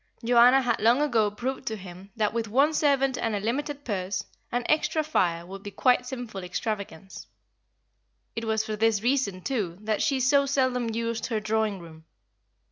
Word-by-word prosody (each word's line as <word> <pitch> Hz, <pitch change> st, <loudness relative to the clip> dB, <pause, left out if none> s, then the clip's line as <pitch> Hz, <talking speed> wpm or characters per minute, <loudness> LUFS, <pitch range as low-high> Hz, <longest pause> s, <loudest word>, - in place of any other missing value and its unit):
Joanna 245 Hz, +3 st, +6 dB
had 240 Hz, -2 st, 0 dB
long 235 Hz, +4 st, +4 dB
ago 235 Hz, -8 st, +2 dB
proved 245 Hz, +6 st, -5 dB
to 220 Hz, -, -1 dB
him 185 Hz, -1 st, -11 dB
that 210 Hz, -2 st, 0 dB
with 230 Hz, -1 st, -2 dB
one 275 Hz, +8 st, +3 dB
servant 275 Hz, -3 st, +2 dB
and 225 Hz, -2 st, -1 dB
a -, -, -1 dB
limited 285 Hz, +7 st, -3 dB
purse, 195 Hz, -2 st, -2 dB, 0.3 s
an 245 Hz, 0 st, -1 dB
extra 310 Hz, 0 st, +1 dB
fire 170 Hz, -, 0 dB
would 195 Hz, +2 st, -9 dB
be 205 Hz, -, -7 dB
quite 250 Hz, +5 st, +3 dB
a -, -, -19 dB
sinful 245 Hz, -6 st, -6 dB
extravagance. 195 Hz, -1 st, -5 dB, 1.1 s
It 230 Hz, -, -3 dB
was 220 Hz, 0 st, 0 dB
for 215 Hz, -, -3 dB
this 220 Hz, -1 st, +1 dB
reason 240 Hz, -7 st, 0 dB
too 205 Hz, -11 st, -2 dB
that 215 Hz, 0 st, -1 dB
she 275 Hz, -2 st, +1 dB
so 280 Hz, +2 st, +3 dB
seldom 255 Hz, -3 st, +1 dB
used 230 Hz, 0 st, -2 dB
her 225 Hz, -3 st, -1 dB
drawing 215 Hz, -1 st, 0 dB
room. 160 Hz, -2 st, -13 dB
225 Hz, 180 wpm, -26 LUFS, 205-260 Hz, 1.1 s, Joanna